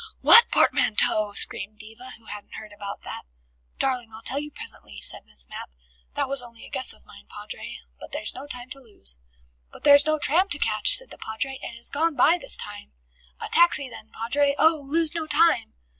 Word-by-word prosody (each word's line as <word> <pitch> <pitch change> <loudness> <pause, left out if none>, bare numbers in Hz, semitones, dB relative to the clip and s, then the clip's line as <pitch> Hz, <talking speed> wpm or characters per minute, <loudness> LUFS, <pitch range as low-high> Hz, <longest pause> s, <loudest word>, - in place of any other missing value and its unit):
"What 465 +1 +10
portmanteau?" 210 -1 +2
screamed 210 +1 -3
Diva, 225 +5 -11
who 225 - -23
hadn't 205 -1 -10
heard 215 -1 -10
about 200 -1 -8
that. - - -7 0.6
"Darling, 250 -4 0
I'll 220 +1 -12
tell 275 - -1
you 295 +1 -6
presently," - - -9
said 75 - -4
Miss 70 -4 -12
Mapp. - - -9 0.5
"That - - -1
was 275 -1 0
only 235 -1 -13
a - - -15
guess 260 - -1
of 65 - -14
mine, 65 - -16
Padre. - - -9 0.2
But - - -11
there's 215 - -4
no 270 +3 -9
time 250 -2 -9
to 275 - -8
lose." 65 - -7 0.5
"But - - -15
there's 285 0 +6
no 310 0 +2
tram 345 +7 +3
to 290 - +3
catch," - - +3
said - - -1
the - - -13
Padre. 265 +5 -5
"It 235 - -7
has 235 - -6
gone 320 +2 0
by 340 +4 +4
this - - -2
time." 205 - -9 0.5
"A - - -5
taxi 340 -6 +3
then, 220 - -11
Padre! 280 +5 0
Oh, 315 -2 +3
lose 325 +1 0
no 325 -2 -4
time!" 320 - +2
255 Hz, 205 wpm, -24 LUFS, 215-295 Hz, 0.6 s, What